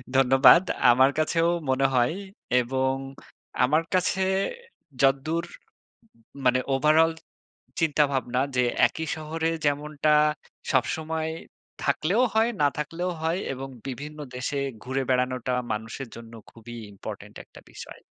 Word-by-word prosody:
ধন্যবাদ। 135 +6 +7 0.3
আমার 130 +3 +5
কাছেও 165 +2 +2 0.2
মনে 135 +1 +2
হয় 120 +5 +3 0.5
এবং 130 +2 0 0.7
আমার 155 +6 +3
কাছে 185 +1 +1 0.8
যদ্দুর 140 +5 +2
উম - - -13 0.9
মানে 130 0 +4
ওভারঅল 155 +4 +4 0.7
চিন্তাভাবনা 140 -5 +1 0.2
যে, 125 - +3 0.2
একই 160 0 -5
শহরে 160 +1 -2 0.2
যেমনটা 150 +1 +1 0.6
সবসময় 160 +4 -1 0.5
থাকলেও 200 +10 +1
হয়, 225 +2 +3
না 145 - +5
থাকলেও 165 +4 -3
হয় 165 +4 0
এবং 135 +1 -7 0.2
বিভিন্ন 145 +4 -7 0.2
দেশে 140 +3 -2 0.2
ঘুরে 130 +1 -1
বেড়ানোটা 125 0 0 0.2
মানুষের 110 +4 -5
জন্য 115 0 -11 0.2
খুবই 120 +1 -11 0.2
ইম্পোর্টেন্ট 100 - -9
একটা - - -16
বিষয়। - - -11
140 Hz, 110 wpm, -26 LUFS, 130-160 Hz, 0.9 s, ধন্যবাদ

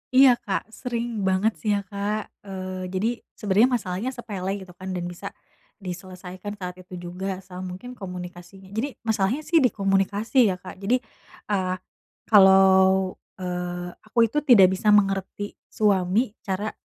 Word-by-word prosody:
Iya 265 0 +9
Kak, 205 +1 -3
sering 235 -2 -3
banget 190 +4 +3
sih 215 - -2
ya - - +1
Kak. 200 +2 -3 0.2
Eee, 185 -1 -5
jadi 190 +5 0 0.3
sebenernya 215 +5 +3
masalahnya 195 0 -3
sepele 200 -5 -4
gitu 185 - -13
kan 185 - -7
dan 175 - -3
bisa 175 0 -6 0.6
diselesaikan 185 +2 -7
saat 180 -2 -7
itu 180 0 -10
juga, 180 +2 -6 0.2
sama 180 -1 -9
mungkin 245 +7 -9
komunikasinya 180 -1 -9
jadi 250 +6 -3
masalahnya 220 +6 0
sih 335 - +4
di 255 - +6
komunikasi 200 +4 +2
ya 185 - 0
Kak, 185 0 -10
jadi, 225 +6 +2 0.5
eee, 185 -2 +1 0.6
kalau, 190 -1 +6 0.2
eee, 180 -1 -4 0.2
aku 240 - -1
itu 230 +7 0
tidak 215 -11 +7
bisa 205 +3 +1
mengerti 195 0 0 0.2
suami, 205 +2 +2
cara 200 +2 -2
195 Hz, 145 wpm, -25 LUFS, 185-215 Hz, 0.6 s, Iya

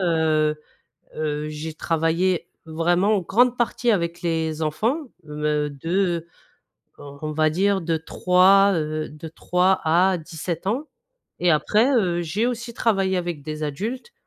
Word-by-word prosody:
heu, 155 -3 +2 0.6
heu, 150 0 -2
j'ai 155 +1 -6
travaillé 165 +3 0 0.2
vraiment 175 +6 +1
en - - -1
grande 245 +7 +2
partie 240 0 +1
avec 170 -4 -1
les 160 -2 -1
enfants. 215 - 0 0.2
Me 150 0 -1
de, 145 +3 -8 1.1
heu, - - -11 0.2
on 155 0 -3
va 155 0 +2
dire, 195 +4 +1
de 165 -1 0
3, 185 +4 +4
heu, 155 -1 -2
de 155 +2 -9
3 180 +3 +1
à 180 +4 +3
17 165 +2 -6
ans. 265 +9 -1 0.5
Et 180 - +3
après, 215 - +3
heu, 175 -7 +1
j'ai 195 +8 -1
aussi 235 -1 -4
travaillé 195 -4 +1
avec 175 -5 -3
des 155 +1 -6
adultes. 220 - -4
170 Hz, 145 wpm, -23 LUFS, 155-195 Hz, 1.1 s, 3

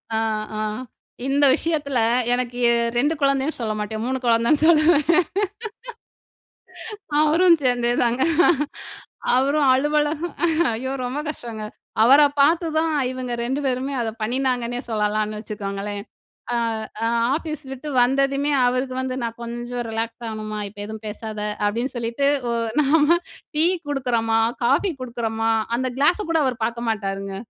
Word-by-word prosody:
அ, - - +1 0.4
ஆ, - - -3 0.7
இந்த 285 +1 +3
விஷயத்துல 290 -6 -1 0.3
எனக்கு 245 -1 -2
எ 235 - +4 0.2
2 290 +6 +2
குழந்தைன்னு 275 +2 +1
சொல்லமாட்டேன். 215 0 -3
3 260 +1 -1
குழந்தைன்னு 235 +6 +3
சொல்லுவேன். 310 -1 +5 2.2
அவரும் 335 +3 +5
சேர்ந்தேதாங்க. 245 0 +1 1.1
அவரும் 280 +3 +2
அலுவலகம் 295 +4 0 0.4
ஐயோ! 260 +4 -3
ரொம்ப 255 +4 -3
கஷ்டங்க. 230 -7 -6 0.4
அவர 275 +5 +7 0.2
பார்த்து 330 +4 +4
தான் 320 0 +1 0.2
இவுங்க 255 -1 -5
2 265 +4 -1
பேருமே 265 +2 -1
அதை 225 -1 -2
பண்ணினாங்கன்னே 245 0 -1
சொல்லலான்னு 215 0 0
வச்சுக்கோங்களேன்! 205 -1 -5 0.5
அ. - - +1 0.5
ஆ - - +2 0.3
ஆஃபீஸ் 310 -1 -4
விட்டு 270 +3 -7
வந்ததுமே, 275 +3 +1
அவருக்கு 255 +1 0
வந்து 260 0 -3
நான் 230 0 -4
கொஞ்சம் 240 +1 -5
ரிலாக்ஸ் 225 +1 -4
ஆகணுமா! 215 -1 -5
இப்ப 205 - -19
எதுவும் 220 0 -8
பேசாத, 215 0 -6 0.2
அப்பிடின்னு 235 +6 -1
சொல்லிட்டு 235 +4 0 0.2
ஒ - - 0 0.3
நாம 300 +4 +4 0.4
டீ 315 - +4 0.2
குடுக்குறமா, 235 -5 +1 0.3
காஃபி 280 +10 +2
குடுக்குறமா 225 -2 -2 0.3
அந்த 255 +1 -1
கிளாஸ 295 +8 +3
கூட 330 - +3
அவரு 250 -2 -1
பார்க்க 235 0 -4
மாட்டாருங்க. 195 -2 -3
250 Hz, 125 wpm, -22 LUFS, 225-280 Hz, 2.2 s, அவர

